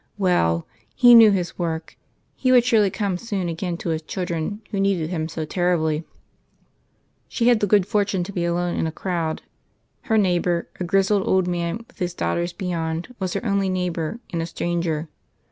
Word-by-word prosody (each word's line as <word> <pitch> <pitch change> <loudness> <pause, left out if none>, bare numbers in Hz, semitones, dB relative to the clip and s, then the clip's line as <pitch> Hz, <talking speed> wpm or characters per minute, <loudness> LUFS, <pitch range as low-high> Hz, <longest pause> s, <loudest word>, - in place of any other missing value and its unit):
Well; 85 - +2 0.3
He 245 -1 +7
knew 225 -2 +9
His 180 -4 -1
work. 160 -2 -3 0.4
He 255 - +1
would 250 -2 +6
surely 220 -5 +4
come 195 -2 -2
soon 200 -5 -3
again 170 +1 -3
to 170 - -4
His 160 -1 -1
children 175 +4 -4
who 200 - -2
needed 190 -5 +1
Him 160 -2 -2
so 160 -1 -4
terribly. 160 -2 0 1.2
She 235 0 +1
had 240 -3 +4
the 205 - +1
good 200 -1 +4
fortune 200 -3 0
to 190 - -7
be 175 - -1
alone 175 +1 0
in - - 0
a - - -3
crowd. 165 -2 -3 0.6
Her 220 - +2
neighbour, 175 -3 +1
a - - -1
grizzled 195 +2 +2
old 190 -1 +2
man 175 +5 -2
with - - -24
his 175 -1 -2
daughters 175 0 -1
beyond, 170 +2 -3
was 185 -2 -2
her - - -3
only 200 -2 +1
neighbour, 180 +2 -2
and 165 - -1
a 165 - -3
stranger. 170 -2 -2
180 Hz, 180 wpm, -23 LUFS, 170-200 Hz, 1.2 s, knew